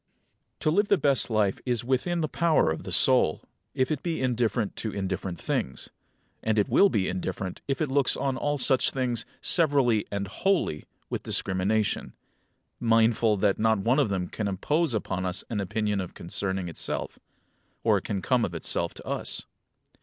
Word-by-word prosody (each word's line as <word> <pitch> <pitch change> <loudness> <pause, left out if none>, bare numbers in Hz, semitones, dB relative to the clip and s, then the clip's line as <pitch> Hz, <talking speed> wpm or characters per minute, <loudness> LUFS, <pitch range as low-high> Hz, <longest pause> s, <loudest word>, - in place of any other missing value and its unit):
16. - - -51
To 155 - +2
live 205 +5 +2
the 200 - +4
best 140 -6 +2
life 105 -3 +1
is 120 -3 0
within 150 +7 0
the 155 - 0
power 165 - +2
of 80 - -4
the 95 - -6
soul, 125 -4 +4 0.3
if 130 +3 +1
it 150 -3 -1
be 165 -2 -2
indifferent 120 -4 0
to 110 - -3
indifferent 95 -3 -4
things. 65 - -3 0.5
And 110 -1 0
it 105 - +3
will 165 +11 +5
be 95 - 0
indifferent 95 0 -4
if 140 +2 0
it 145 - -3
looks 140 -1 +2
on 135 -1 -1
all 145 +2 -1
such 130 -1 +4
things, 125 -3 -1 0.2
severally 140 - +2
and 100 -1 -3
wholly, 140 - 0 0.3
with - - -2
discrimination; 100 +3 0 0.7
mindful 115 -1 +3
that 100 0 +1
not 110 0 +3
one 120 +8 +2
of 135 -7 +2
them 95 -2 -1
can 105 +2 -4
impose 145 - 0
upon 95 -3 -2
us 90 +1 -1
an 110 - -1
opinion 105 +1 -1
concerning 95 +2 -3
itself, 80 - -4 0.6
or - - +3
can 100 -3 -4
come 125 -2 +2
of 85 - -3
itself 85 - -1
to - - -12
us. - - -2
110 Hz, 175 wpm, -27 LUFS, 95-135 Hz, 0.7 s, will